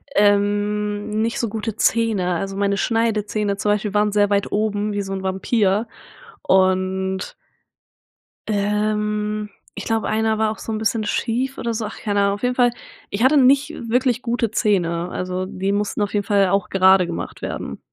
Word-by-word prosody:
ähm, 205 0 +1
nicht 225 +5 -1
so 230 - -1
gute 220 0 -4
Zähne. 215 -6 +1
Also, 195 +2 -3
meine 200 0 +1
Schneidezähne 215 -2 0
zum 205 +1 0
Beispiel 210 -1 -1
waren 210 0 +3
sehr 205 -1 +3
weit 200 0 0
oben 210 0 -1
wie 205 - -1
so 195 0 -5
'n 190 0 -4
Vampir 195 +3 +1 0.6
und 190 0 +1 1.1
ähm. 210 0 -1 0.3
Ich - - -7
glaube 225 -1 0
einer 220 0 0
war 220 -1 +2
auch 220 - -7
so - - -6
'n 215 - -2
bisschen 220 0 0
schief 245 +5 -1
oder 235 - -2
so. 220 -1 -2
Ach, 210 - -8
keine 205 -2 0
Ahnung, 200 0 +2
auf 205 - -7
jeden 250 0 0
Fall. 245 -1 +4 0.4
Ich 205 +4 -1
hatte 285 +3 +5
nicht 275 +3 +4 0.2
wirklich 250 0 +1
gute 235 -2 0
Zähne. 175 -6 0
Also, 185 0 -3
die 190 +1 -2
mussten 205 +1 -1
auf 205 - -1
jeden 205 -1 0
Fall 200 -2 +3
auch 195 -1 0
gerade 190 -1 +5
gemacht 170 -1 -6
werden. - - -5
210 Hz, 175 wpm, -21 LUFS, 200-220 Hz, 1.1 s, hatte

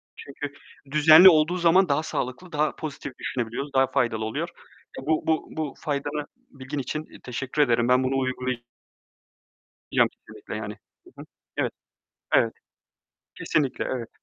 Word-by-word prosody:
Çünkü 140 0 -7 0.4
düzenli 155 +5 +9
olduğu 160 +2 +3
zaman 175 +1 +4
daha 150 +3 +2
sağlıklı, 150 +4 -4
daha 150 0 0
pozitif 140 -3 -7
düşünebiliyoruz, 130 +3 -3
daha 135 0 +4
faydalı 115 -5 0
oluyor. 110 - -3 0.5
Eee, - - -9
bu, 155 0 +2
bu, 160 -1 +1
bu 155 -4 -2
faydalı 145 0 -3 0.2
bilgin 135 +2 -6
için, 155 +4 -4
eee, - - -15
teşekkür 130 +4 -2
ederim. 120 -3 +3
Ben 125 +1 +4
bunu 135 +1 0
uygula 130 -1 -1 1.4
yacağım - - +4
kesinlikle - - -11
yani. 105 0 -5 0.3
Hı - - -14
hı. - - -10 0.3
Evet, - - 0 0.6
evet. - - +4 0.9
Kesinlikle, 140 -4 0
evet. 120 -3 -4
140 Hz, 145 wpm, -25 LUFS, 130-155 Hz, 1.4 s, düzenli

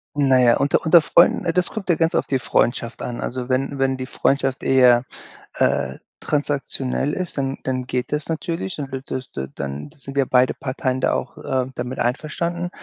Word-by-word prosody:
Na 135 -3 +4
ja, 120 -2 +5
unter 140 +2 +2
unter 165 +1 +7
Freunden, 170 +4 +4
ne, 170 - 0
das 180 0 +2
kommt 195 -4 -6
ja 175 - +5
ganz 165 0 +1
auf - - +1
die 135 - 0
Freundschaft 120 -1 0
an. 120 - -4
Also, 125 0 -4
wenn 135 +2 0
wenn 135 -1 +1
die 130 - -4
Freundschaft 135 -1 0
eher, 125 -1 +5 0.5
äh, 65 - +1 0.2
transaktionell 145 -1 -1
ist, 180 -5 -4
dann 135 0 -1
dann 130 -1 -2
geht 125 +1 -2
das 150 0 -2
natürlich, 165 +3 -3
dann 140 -3 -6
wird 135 0 -6
das 130 -1 -5
da 65 0 -5
dann 70 +1 -5
sind 135 0 -9
ja 135 - +4
beide 125 0 +3
Parteien 130 -1 -2
da - - +2
auch, - - -4
äh, 130 -1 -1
damit 125 +2 -4
einverstanden. 170 +7 -2
135 Hz, 195 wpm, -22 LUFS, 125-150 Hz, 0.5 s, unter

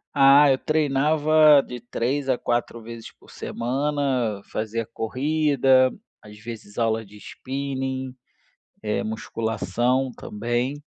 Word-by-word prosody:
Ah, 140 +1 +7
eu 130 - +1
treinava 155 0 +4
de 125 -1 -7
3 130 +3 -2
a 125 - +2
4 120 0 -2
vezes 115 0 -9
por - - -18
semana, 130 -4 -2
fazia 110 +1 -3
corrida, 135 +1 +2 0.3
às 105 0 -14
vezes 110 -2 -10
aula 115 -1 0
de 105 +1 -15
spinning, 130 +1 -5 0.7
eh, 105 -1 -1
musculação 115 +3 -1
também. 120 +8 -3
130 Hz, 110 wpm, -24 LUFS, 115-140 Hz, 0.7 s, Ah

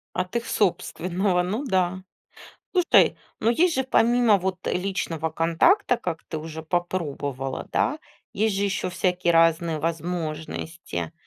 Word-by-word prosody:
От 185 +4 -3
их 235 - -1
собственного, 180 -1 0
ну 210 +9 -2
да. 185 -4 0 0.7
Слушай, 360 -2 +4 0.2
ну 225 - +2
есть 330 +7 +3
же, 265 - 0
помимо 240 -4 +4
вот 190 0 -4
личного 175 -4 -2
контакта, 245 - +3
как 170 -7 -5
ты 160 - -5
уже 160 0 -7
попробовала, 145 -6 -3
да, 295 +4 +1 0.3
есть 215 -1 0
же 200 - +1
еще 195 -2 -1
всякие 180 -1 +1
разные 165 -1 +3
возможности 160 - -4
180 Hz, 130 wpm, -25 LUFS, 165-205 Hz, 0.7 s, Слушай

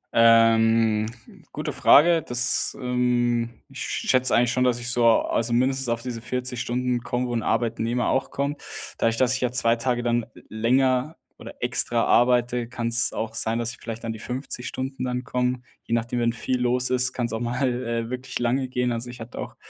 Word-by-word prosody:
Ähm, 115 -1 +4 0.5
gute - - -4
Frage, 165 +2 +5
das, 120 0 +2
ähm, 120 -2 0 0.2
ich - - -10
schätze 130 0 +1
eigentlich 120 0 +3
schon, 125 +1 +1
dass 125 -1 +1
ich 120 +1 -2
so, 120 -1 +3
also, 115 +1 +2
mindestens 130 +1 +1
auf 115 0 -2
diese 120 -3 -5
40 125 0 -3
Stunden 125 0 -1
bekomme, 125 +1 -2
wo 120 - -4
‘n 115 - 0
Arbeitnehmer 115 +2 0
auch 135 - 0
kommt. 140 +1 -3 0.4
Dadurch, 115 0 +1
dass 130 0 +2
ich 130 - -2
ja 125 -1 0
2 120 -2 +2
Tage 120 0 -1
dann 120 -1 0 0.2
länger 130 +6 +1 0.2
oder - - -10
extra 120 -1 0
arbeite, 120 -1 +2
kann's 115 -1 -1
auch 110 0 -4
sein, 110 +1 0
dass 120 0 -2
ich - - -12
vielleicht 115 0 -7
an 115 - -3
die 110 - -9
50 125 +1 -5
Stunden 130 0 -5
dann 125 0 -2
komme. 125 0 -1 0.2
Je 115 - -4
nachdem, 120 +1 -2
wenn 115 0 +2
viel 125 +2 -2
los 125 +1 +2
ist, 130 +1 +3
kann's 120 -3 -3
auch 110 - -2
mal, 125 +3 -1 0.2
äh, 115 0 -3
wirklich 130 +1 -4
lange 130 +2 0
gehen. 125 -1 -1
Also, 120 +1 -5
ich 125 - -10
hatte 115 +1 -9
auch - - -6
120 Hz, 195 wpm, -24 LUFS, 115-125 Hz, 0.5 s, Frage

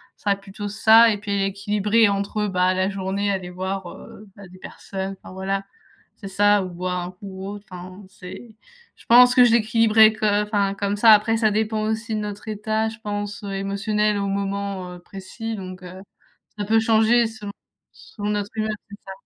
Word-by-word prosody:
Ça 205 - -4
va - - +5
être 195 - -19
plutôt 205 +1 -7
ça 220 +2 +6
et 205 - -2
puis 200 -1 -2
équilibrer 205 +3 +1
entre 200 +1 -1
bah, 185 -1 +1
la 185 +1 +1
journée 195 +1 -2
aller 185 -2 -4
voir, 185 0 -5
heu, 215 - -13
bah, 200 -2 -12
des 185 +1 -16
personnes, 195 0 -7
enfin - - -12
voilà 195 +1 -3 0.5
c'est 195 - -9
ça. 205 0 +3
Ou 185 - -6
boire 180 +1 -3
un 175 - -6
coup 185 +2 -24
ou 190 0 -8
autre, 205 0 -9
enfin 185 +2 -10
c'est 215 +4 -12 0.4
je - - -21
pense 245 +1 +7
que 250 - +7
j'équilibrerais 220 -1 +4
co 215 0 -3
enfin 205 -1 +1
comme 200 0 -2
ça, 225 +1 +6
après 215 +2 +3
ça 220 -1 +2
dépend 215 +1 -1
aussi 220 +1 -3
de - - -2
notre 210 +1 -7
état 215 +1 -1
je 225 +1 -11
pense 205 -1 -5
émotionnel 200 +2 -1
au 200 - -2
moment, 195 -2 -3
heu, 175 - -11
précis 200 +5 -7
donc 185 -1 -8
heu, 180 +1 -10 0.6
ça 205 - -2
peut 225 +1 +3
changer 225 +1 +3
selon 220 -2 -8 0.4
selon 205 -1 -8
notre 205 -1 -2
humeur, 215 0 -1 0.2
c'est 205 - -9
ça. 190 - -7
205 Hz, 195 wpm, -22 LUFS, 195-215 Hz, 0.6 s, pense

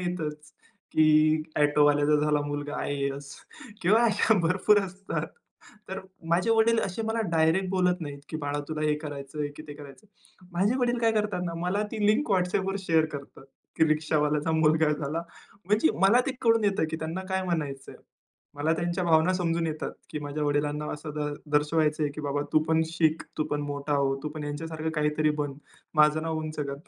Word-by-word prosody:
येतंच, 155 -4 -4 0.4
की 155 0 +4 0.2
ऑटोवाल्याचा 145 0 +4
झाला 150 -1 +2
मुलगा 145 0 -4
आय-ए-एस 140 0 -3 0.5
किंवा 210 +6 +4
अशा 220 0 +3
भरपूर 185 +5 +3
असतात. 195 0 -4 0.6
तर 190 +1 -4 0.3
माझे 180 +7 +2
वडील 225 0 +4
असे 195 +4 -4
मला 225 +1 0
डायरेक्ट 165 +4 +2
बोलत 180 -1 +1
नाहीत, 145 -3 -6
की 155 - -4
बाळा 145 -1 -2
तुला 155 -1 -4
हे 150 - +2
करायचंय 145 -1 -5
की 155 - -8
ते 145 - -7
करायचं. 145 +7 -13 0.5
माझे 200 +8 +1
वडील 245 -1 +1
काय 225 -1 +3
करतात 210 -4 -1
ना, 170 -1 -3
मला 195 +4 0
ती 215 -2 -1
लिंक 240 +9 +2
WhatsAppवर 190 +1 +1
शेअर 160 -1 +4
करतात. 140 -1 -12 0.3
की 160 - +5
रिक्षावाल्याचा 150 0 +1
मुलगा 160 0 +3
झाला. 150 +2 -2 0.4
म्हणजे 205 -3 +3
मला 200 +6 +6
ते - - +1
कळून 230 -2 +3
येतं 200 -4 +2
की 160 - -2
त्यांना 160 +3 -4
काय 190 0 0
म्हणायचं 150 -7 -3
आहे. - - -15 0.6
मला 150 +3 0
त्यांच्या 175 +2 -1
भावना 165 +2 +4
समजून 170 -2 0
येतात 155 -1 -4 0.2
की - - -4
माझ्या 145 +1 -4
वडिलांना 145 +1 0
असं 150 0 -6
द 150 -1 -2 0.2
दर्शवायचं 150 +1 +2
आहे, 145 - 0
की 155 - -7
बाबा 145 0 -1
तू - - +6
पण 160 0 +2
शिक, 160 -1 +1 0.2
तू 155 - +1
पण 145 0 0
मोठा 145 +1 -3
हो. 135 -1 +1
तू 150 - -2
पण 150 0 -7
ह्यांच्यासारखं 160 +2 -4
काहीतरी 150 0 +1
बन. 145 -1 -2 0.4
माझं 150 +1 +4
नाव 160 -1 -2
उंच 155 0 -5
कर. 140 -1 -3
155 Hz, 180 wpm, -27 LUFS, 150-180 Hz, 0.6 s, मला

